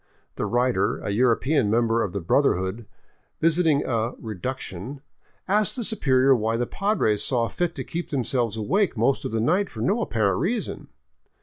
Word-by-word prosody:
The - - -2
writer, 120 -5 +1
a - - -4
European 125 +3 +2
member 115 +1 +2
of 100 - -1
the 100 - -4
brother 140 - +3
hood, 95 +5 -4 0.5
visiting 160 -3 +2
a 115 0 -1
" - - -23
reduction," 115 +2 -6 0.5
asked 210 +2 +1
the 245 - -3
superior 135 - +3
why 115 0 0
the 120 - 0
Padres 160 - 0
saw 120 -3 0
fit 175 +3 -2
to - - -4
keep 170 +1 -5
themselves 120 -5 -1
awake 185 - 0
most 120 +5 +1
of - - -3
the 115 - -1
night 180 - +1
for - - -8
no 210 +5 +1
apparent 100 - 0
reason. 215 - -2
125 Hz, 175 wpm, -24 LUFS, 110-165 Hz, 0.5 s, brother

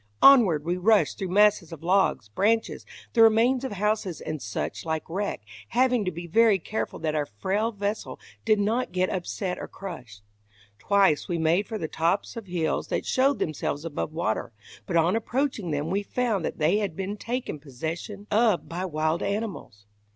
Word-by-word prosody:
Onward 205 - +7
we 175 +2 0
rushed 210 +4 +3
through 190 - -3
masses 205 -3 +3
of 165 -1 -9
logs, 190 - +2
branches, 220 - 0 0.3
the 230 - +4
remains 230 +4 +5
of 265 - -3
houses, 205 -3 -1
and 155 -2 -5
such 105 0 -4
like 160 -1 -3
wreck, 195 - -3 0.3
having 250 -2 +2
to - - +1
be 170 +1 -7
very 220 +4 +4
careful 215 +4 -4
that 155 -1 -2
our 150 -2 -1
frail 195 - -1
vessel 205 - -4 0.2
did 215 -1 +3
not 225 +5 0
get 185 +1 0
upset 180 0 -3
or - - -6
crushed. 125 - -9 0.6
Twice 195 -7 +3
we 175 - -1
made 165 +5 +2
for 220 - -4
the 160 - -3
tops 165 +5 -1
of 225 -4 -7
hills 170 -3 -1
that - - -2
showed 270 +2 +2
themselves 155 -1 -2
above 155 -1 -3
water, 155 -10 -2 0.4
but 170 - +1
on 165 +5 +3
approaching 230 -3 -1
them 150 0 -2
we 200 +2 +1
found 220 -3 -1
that - - -4
they 160 +6 +3
had 200 -6 -2
been 195 +3 -3
taken 235 - -4
possession 160 - -6
of 215 -3 +3
by 175 +2 -4
wild 155 -1 -1
animals. 200 - -4
190 Hz, 180 wpm, -26 LUFS, 160-215 Hz, 0.6 s, Onward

